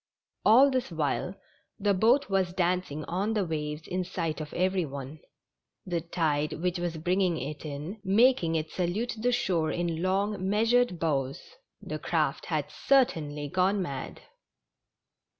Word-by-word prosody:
All 260 +6 +7
this 255 -2 -1
while 160 +4 -1 0.4
the 205 0 +2
boat 235 +9 +3
was 190 -2 0
dancing 175 -5 0
on 200 +6 -1
the 205 -3 +1
waves 150 -1 -4
in 185 0 -1
sight 165 -4 -3
of 150 - -7
every 185 0 +1
one; 140 0 -7 0.7
the 175 -2 -1
tide, 155 -3 0
which 180 +2 -2
was 175 -2 -2
bringing 180 +1 +1
it 145 +1 -5
in, 155 +8 -6
making 200 -4 +4
it 155 -1 -2
salute 190 +7 -1
the 245 +3 +2
shore 180 -10 +1
in 170 -2 -2
long, 190 +1 0
measured 225 -1 +3
bows 140 -5 -1 0.2
— - - -54
the - - -3
craft - - -1
had - - -2
certainly 150 - +1
gone 185 +5 +1
mad. 140 -8 -5
180 Hz, 150 wpm, -28 LUFS, 155-200 Hz, 0.7 s, All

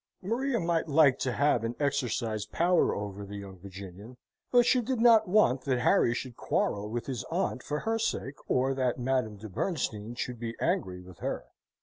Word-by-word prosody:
Maria 240 +5 0
might 170 -2 0
like 145 -3 +5
to 130 - 0
have 145 -5 +2
and 115 +1 -2
exercise 120 -7 -1
power 175 +1 +2
over 100 0 -5
the 100 +1 -7
young 95 -2 -9
Virginian; 100 +5 -10 0.3
but 245 -1 +6
she 250 +1 +4
did 250 +1 -2
not 230 -3 +6
want 180 - +3
that 130 -1 0
Harry 120 - +4
should 125 -1 -5
quarrel 105 +1 -1
with 120 +1 -3
his 130 -4 -4
aunt 165 -6 -1
for 150 +3 -3
her 225 0 0
sake, 145 -10 -2 0.2
or 130 +1 +2
that 130 -2 0
Madame 125 -4 -1
de 110 +2 -8
Bernstein 115 - -3
should 125 -1 -4
be 115 -1 -4
angry 155 - -1
with 90 -1 -14
her. - - -3
130 Hz, 190 wpm, -29 LUFS, 110-170 Hz, 0.3 s, but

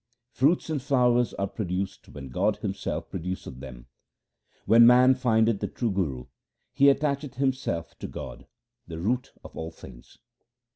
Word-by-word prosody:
Fruits 145 +8 +2
and 150 -4 -1
flowers 125 -3 +2
are 100 - -1
produced 95 -1 -4
when 70 -2 -9
God 100 +11 +1
Himself 100 -2 -4
produceth 90 -7 -5
them. 60 -3 -10 0.8
When 115 +1 +7
man 125 +2 +7
findeth 115 -4 +2
the - - -2
true 120 -3 -2
Guru, 75 -10 -2 0.5
he 140 +1 +3
attacheth 140 0 +1
himself 130 - -2
to - - -5
God, - - -9 0.4
the 80 - -7
root 120 +9 -1
of - - -12
all 80 - -5
things. 60 -7 -15
110 Hz, 145 wpm, -26 LUFS, 85-130 Hz, 0.8 s, When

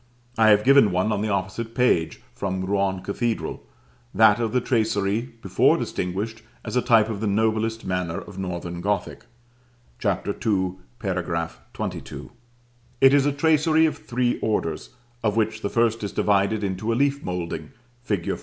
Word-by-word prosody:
I 110 -1 +5
have 105 0 +5
given 135 -5 +6
one, 90 +4 +1
on 105 -1 0
the 110 - -1
opposite 105 +4 -3
page, 85 -11 +1
from 95 -1 -3
Rouen 95 -1 0
cathedral; 115 +3 -2 0.5
that 110 +1 +6
of 115 -2 -1
the 125 - +2
tracery 110 -1 0
before 95 -1 +3
distinguished 105 +5 -3 0.2
as - - -4
a 125 - +3
type 115 -4 +4
of 110 -2 -4
the 110 - 0
noblest 110 +2 0
manner 90 -3 -2
of 100 -2 -8
Northern 85 -2 -4
Gothic 100 +2 -2 0.7
(Chap. 100 -4 -1
II. 100 - 0 0.7
§ 85 -4 -2 0.5
XXII.). - - -9 0.7
It 135 0 +6
is 145 0 +4
a - - +2
tracery 160 +2 +3
of 155 - -1
three 120 0 -1
orders, 80 -8 -2 0.3
of 105 -2 +1
which 110 0 0
the 100 - -2
first 115 -1 +1
is 100 - -3
divided 100 +1 +1
into 100 +3 -2
a - - +1
leaf 140 +2 +1
moulding, 85 -4 -4 0.3
fig. 105 -8 -2
105 Hz, 160 wpm, -24 LUFS, 95-115 Hz, 0.7 s, given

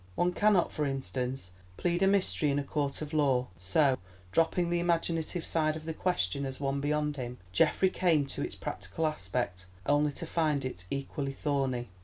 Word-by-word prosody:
One 175 - +2
cannot, 205 -3 +3
for 150 -1 -1
instance, 130 -4 -3 0.3
plead 175 0 0
a 195 - +5
mystery 195 -6 +2
in 140 - +1
a 145 - 0
court 140 +1 -2
of 150 +1 -7
law; 135 -5 +2
so, 130 - +2 0.3
dropping 170 - +2
the 175 - +2
imaginative 170 0 0
side 155 -1 +1
of 160 0 -7
the 160 - -3
question 140 - 0
as 135 -1 -4
one 140 0 -1
beyond 150 0 0
him, 125 -1 -5
Geoffrey 185 - +3
came 160 -6 +3
to 135 - -6
its - - -3
practical 165 - -3
aspect, 95 -8 -2 0.2
only 145 +1 +3
to 165 - -4
find 155 -4 +1
it 90 -9 -5
equally 140 0 -3
thorny. 135 -4 -1
145 Hz, 180 wpm, -31 LUFS, 135-165 Hz, 0.3 s, a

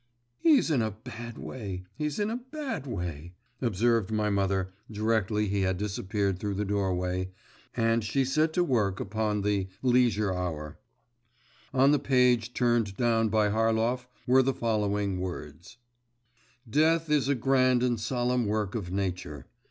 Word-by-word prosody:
'He's 290 - +4
in 135 -6 +3
a 110 - 0
bad 115 +2 -9
way, 95 -7 -6
he's 150 -1 -3
in 210 +1 0
a 235 - -1
bad 260 - -5
way,' 85 - -5 0.3
observed 115 -2 +1
my 105 -1 +1
mother, 95 -1 0 0.2
directly 105 -1 0
he 100 0 0
had 95 -1 +1
disappeared 100 -1 -2
through 100 -1 -2
the 105 +2 -1
doorway, 95 -2 -1 0.5
and 115 0 +2
she 130 +6 +1
set 155 +4 +2
to 180 - +2
work 105 - +1
upon 105 0 -1
the 100 -2 0 0.2
Leisure 120 -6 +3
Hour. 80 -5 -4 0.9
On 135 +1 +4
the 150 - +3
page 125 -3 +2
turned 120 -5 +1
down 115 -2 +2
by 105 -1 +2
Harlov 115 +3 +1 0.2
were 130 +1 +5
the 130 0 0
following 105 -4 0
words: 90 +2 -7 0.9
'Death 160 +5 +2
is 145 -4 +3
a 140 - +2
grand 130 0 +3
and 120 -2 +1
solemn 120 0 0
work 105 -2 -1
of 100 -7 -4
nature. 90 -8 -3
110 Hz, 150 wpm, -28 LUFS, 100-125 Hz, 0.9 s, were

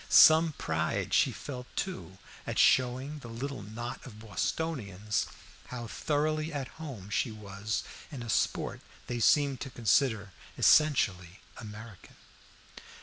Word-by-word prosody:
Some 160 0 +8
pride 80 - -1
she - - +4
felt, 125 -3 -7
too, 95 - -4 0.3
at - - -3
showing 130 +4 +3
the 125 - -10
little 125 +2 -5
knot 110 +4 -6
of 115 -5 -11
Bostonians 105 - -2 0.4
how 120 -2 -6
thoroughly 155 +5 -1
at 140 -4 -4
home 115 -11 -7
she 120 - +1
was 105 0 -4 0.3
in 130 -5 -6
a - - -7
sport - - 0 0.2
they 120 -1 -3
seemed 140 +2 +3
to 135 - -4
consider 110 -3 +2 0.3
essentially 100 - +4 0.2
American. 110 -2 -10
120 Hz, 125 wpm, -30 LUFS, 105-145 Hz, 0.4 s, Some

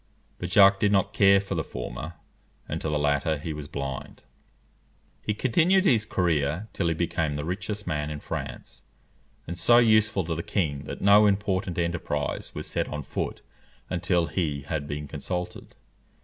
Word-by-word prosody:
But 90 - -4
Jacques 95 +1 +6
did 105 -1 +3
not 100 0 +2
care 100 -1 +6
for 100 - -4
the - - -1
former, 70 +8 -6 0.5
and - - -4
to 80 - -2
the 75 - +1
latter 75 +1 +1
he 80 +2 -5
was 75 -1 -7
blind. 70 -2 -6 1.0
He 105 - -2
continued 170 - +3
his 115 - +4
career 85 +1 0
till 85 - -1
he 85 - +1
became 80 -2 -1
the 75 +1 -3
richest 100 +4 -4
man 75 -3 -2
in 75 -1 -5
France, - - -6 0.6
and 85 - -5
so 105 +8 +5
useful 110 -5 +4
to 80 - -2
the 80 - -3
king 75 -7 -2
that - - -7
no 105 +1 +7
important 95 -3 0
enterprise 85 -4 -2
was - - -4
set - - -1
on 75 -1 -5
foot - - -4 0.5
until 90 -1 +1
he 75 -3 -2
had 75 0 -3
been 75 0 -4
consulted. 90 +5 -5
85 Hz, 170 wpm, -26 LUFS, 75-100 Hz, 1.0 s, no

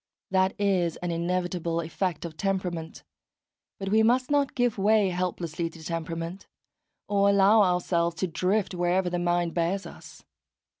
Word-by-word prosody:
That 190 0 +2
is 185 -5 +1
an 175 - -1
inevitable 170 0 -1
effect 170 +1 -3
of 165 -2 -7
temperament; 180 -4 -3 0.7
but 195 -1 -4
we 215 +2 +4
must 250 +4 +2
not 285 -2 +1
give 245 -4 +1
way 210 0 +4
helplessly 175 -2 -2
to 165 -1 -13
temperament, 165 +2 -5 0.6
or 200 -1 +3
allow 200 +2 +5
ourselves 175 -2 +1
to 185 +3 -1
drift 185 +4 0
wherever 180 +1 +1
the 175 - -1
mind 175 -1 0
bears 175 +3 -1
us. - - -12
180 Hz, 145 wpm, -27 LUFS, 170-195 Hz, 0.7 s, allow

